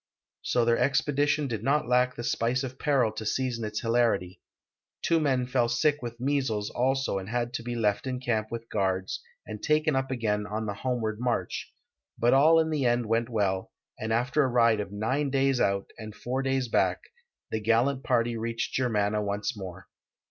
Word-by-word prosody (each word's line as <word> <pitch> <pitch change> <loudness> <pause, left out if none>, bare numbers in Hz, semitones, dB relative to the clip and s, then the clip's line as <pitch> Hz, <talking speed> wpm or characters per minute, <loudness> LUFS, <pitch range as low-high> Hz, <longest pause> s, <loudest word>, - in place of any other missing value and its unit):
So 120 -1 +1
their 115 0 +3
expedition 145 +1 +2
did 110 -5 -3
not 140 0 +1
lack 125 +1 +2
the 120 - -6
spice 120 +2 0
of 130 0 -6
peril 135 -7 +2
to 110 0 -6
season 120 +1 -1
its 105 0 -3
hilarity. 115 -6 +1 0.6
Two 165 - +3
men 130 -5 +1
fell 125 -2 +1
sick 145 +5 +1
with 120 -1 -6
measles 130 -6 -1
also 135 -4 0
and 95 +1 -8
had 120 0 -2
to 125 - -3
be 120 +1 -4
left 105 +1 0
in 130 -1 -2
camp 110 -4 -1
with 115 0 -6
guards 95 -2 -1 0.2
and 105 -1 -7
taken 155 -1 +2
up 130 0 0
again 105 -5 -1
on 110 +1 -3
the 100 - -2
homeward 110 -1 -2
march, 120 -7 -2 0.5
but 120 +1 +3
all 155 +5 +6
in 160 0 +1
the 150 -3 0
end 120 -1 +2
went 115 +2 0
well, 100 -5 -1 0.3
and 110 +1 -3
after 125 +6 +2
a - - +2
ride 115 -3 +3
of 100 -1 -4
nine 130 +8 -1
days 135 -1 +2
out 100 0 0
and 110 -1 -8
four 125 +5 -2
days 135 -1 0
back - - +1 0.5
the 110 - -1
gallant 120 +5 +2
party 120 -2 +1
reached 115 +1 -3
Germanna 105 -4 +1
once 105 +5 -2
more. 95 -3 -8
120 Hz, 190 wpm, -28 LUFS, 110-130 Hz, 0.6 s, all